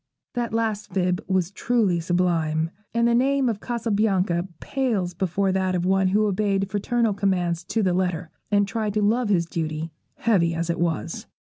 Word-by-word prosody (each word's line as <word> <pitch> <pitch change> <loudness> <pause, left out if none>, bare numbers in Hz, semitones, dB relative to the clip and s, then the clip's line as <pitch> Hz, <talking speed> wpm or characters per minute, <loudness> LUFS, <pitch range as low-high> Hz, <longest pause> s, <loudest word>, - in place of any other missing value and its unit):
That 240 -2 -2
last 220 -2 -1
fib 180 -1 0
was 185 -2 +1
truly 210 -6 +1
sublime, 165 -2 0 0.2
and 235 0 +2
the 235 - +3
name 270 +2 +3
of 220 -4 -1
Cassabianca 205 -7 0
pales 220 -10 -1
before 190 +2 0
that 185 -1 0
of 175 0 0
one 190 0 +3
who 210 +3 +3
obeyed 195 -1 +1
fraternal 225 +2 +1
commands 180 -4 0
to 225 - 0
the 185 -2 +2
letter, 180 -2 -1 0.2
and 205 -1 +3
tried 215 -1 -2
to 210 - +2
love 225 +2 +2
his 175 -4 +3
duty, 160 -1 -3 0.2
heavy 175 -8 +2
as 170 +1 -1
it 170 - -4
was. 165 -10 -2
195 Hz, 170 wpm, -24 LUFS, 175-215 Hz, 0.2 s, the